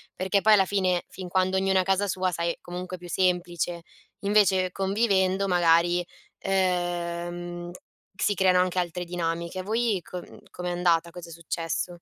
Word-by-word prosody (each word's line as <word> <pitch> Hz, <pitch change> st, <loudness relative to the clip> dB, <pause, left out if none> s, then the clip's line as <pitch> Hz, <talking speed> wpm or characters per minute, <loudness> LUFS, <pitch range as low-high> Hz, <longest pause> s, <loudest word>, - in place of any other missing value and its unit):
Perché 190 Hz, +2 st, +1 dB
poi 215 Hz, +1 st, +6 dB
alla 195 Hz, -2 st, +5 dB
fine, 185 Hz, -2 st, +1 dB
fin 185 Hz, -1 st, -8 dB
quando 185 Hz, +1 st, +1 dB
ognuno 190 Hz, 0 st, +2 dB
è -, -, +2 dB
casa 195 Hz, +2 st, +1 dB
sua, 185 Hz, -1 st, 0 dB
sai, 170 Hz, 0 st, -2 dB
comunque 180 Hz, +1 st, -6 dB
è 180 Hz, -, -13 dB
più 175 Hz, 0 st, -10 dB
semplice. 175 Hz, -2 st, 0 dB, 0.4 s
Invece 195 Hz, -3 st, +3 dB
convivendo 195 Hz, -1 st, +1 dB
magari, 175 Hz, 0 st, +3 dB, 0.4 s
ehm, 175 Hz, -2 st, -2 dB, 0.5 s
si 205 Hz, -, +1 dB
creano 185 Hz, -1 st, +3 dB
anche 185 Hz, 0 st, +1 dB
altre 180 Hz, 0 st, -2 dB
dinamiche. 170 Hz, +1 st, -3 dB
Voi 220 Hz, 0 st, 0 dB
co 180 Hz, -, -8 dB
uhm, -, -, -13 dB
com'è 180 Hz, 0 st, -5 dB
andata? 170 Hz, -1 st, +2 dB
Cosa 175 Hz, 0 st, -9 dB
è -, -, -10 dB
successo? 170 Hz, +1 st, -3 dB
180 Hz, 160 wpm, -26 LUFS, 175-190 Hz, 0.5 s, poi